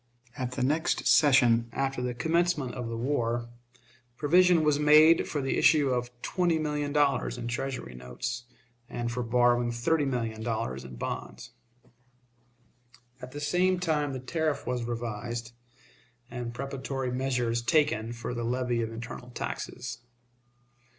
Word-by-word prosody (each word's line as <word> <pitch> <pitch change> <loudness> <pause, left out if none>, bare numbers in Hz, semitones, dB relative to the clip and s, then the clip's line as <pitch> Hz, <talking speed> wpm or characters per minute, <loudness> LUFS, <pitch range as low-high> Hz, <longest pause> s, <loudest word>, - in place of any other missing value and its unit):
At 125 -3 -3
the - - -2
next 150 +5 +1
session, 120 -5 +5
after 135 0 -2
the 125 -1 -2
commencement 160 -2 +1
of 125 -2 -4
the 115 - -4
war, 120 -2 -1 0.7
provision 175 +2 +4
was 150 -1 +3
made 155 +2 +6
for 145 -3 -2
the 135 - 0
issue 145 -4 +4
of 125 -1 -1
twenty 175 -3 +1
million 150 -2 -2
dollars 140 -5 +1
in 120 -1 -5
Treasury 120 - -4
notes, 65 - -5 0.4
and 120 0 -3
for 125 +1 -2
borrowing 120 0 +2
thirty 145 +6 +1
million 115 -4 -2
dollars 65 - -3
in 65 -1 -9
bonds. - - -6 1.7
At 125 - -8
the 145 - -6
same 180 +5 +2
time 150 -5 0
the 130 - -4
tariff 155 +3 -2
was 125 -2 -2
revised, 115 0 -4 0.8
and 120 -1 -4
preparatory 135 0 -4
measures 125 -2 0
taken 120 -5 +2
for 120 +1 -5
the 120 -1 -3
levy 120 0 0
of 115 0 -3
internal 115 +2 -8
taxes. 125 0 -5
125 Hz, 140 wpm, -28 LUFS, 120-145 Hz, 1.7 s, made